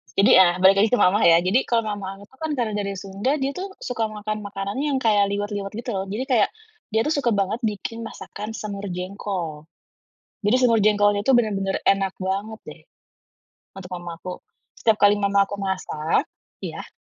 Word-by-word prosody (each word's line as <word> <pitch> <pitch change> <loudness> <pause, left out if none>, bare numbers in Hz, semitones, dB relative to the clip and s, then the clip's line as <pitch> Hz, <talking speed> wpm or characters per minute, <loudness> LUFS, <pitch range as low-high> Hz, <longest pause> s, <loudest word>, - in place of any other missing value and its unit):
jadi, 195 - +5
ah, 175 -1 +3
balik 190 +1 +8
lagi 215 +2 +4
ke - - -2
mama 190 +3 +3
ya 165 - +7
jadi 190 +8 +3
kalau 230 -1 +2
mama 205 -1 -5
aku 200 - -14
tuh 265 - -22
kan 315 - -1
karena 230 -3 0
dari 200 -1 -3
Sunda 195 +9 -2
dia 270 - 0
tuh 390 - -3 0.2
suka 230 -3 -1
makan-makanan 210 -1 -5
yang 280 -2 +1
kayak 205 -3 +4
liwet-liwet 205 -1 -3
gitu 240 +3 -5
loh 190 - -2
jadi 215 +6 -3
kayak 220 -5 +4 0.4
dia 220 +1 +2
tuh 300 - -1
suka 240 -4 +1
banget 200 +4 0
bikin 210 +3 -6
masakan 215 +2 -8
semur 200 -2 -5
jengkol, 180 -5 -5 0.8
jadi 210 - +4
semur 235 -2 +4
jengkolnya 205 -1 +3
itu 270 - +4
bener-bener 200 -5 +1
enak 195 -1 +2
banget 200 +4 -3
deh, - - -12 0.9
untuk 190 -1 -10
mama 175 -1 -7
aku 180 - -6 0.4
setiap 220 -2 +2
kali 205 0 +6
mama 200 0 +3
aku 200 - -6
masak, 185 -5 -1 0.4
iya? - - -7
205 Hz, 185 wpm, -23 LUFS, 195-220 Hz, 0.9 s, balik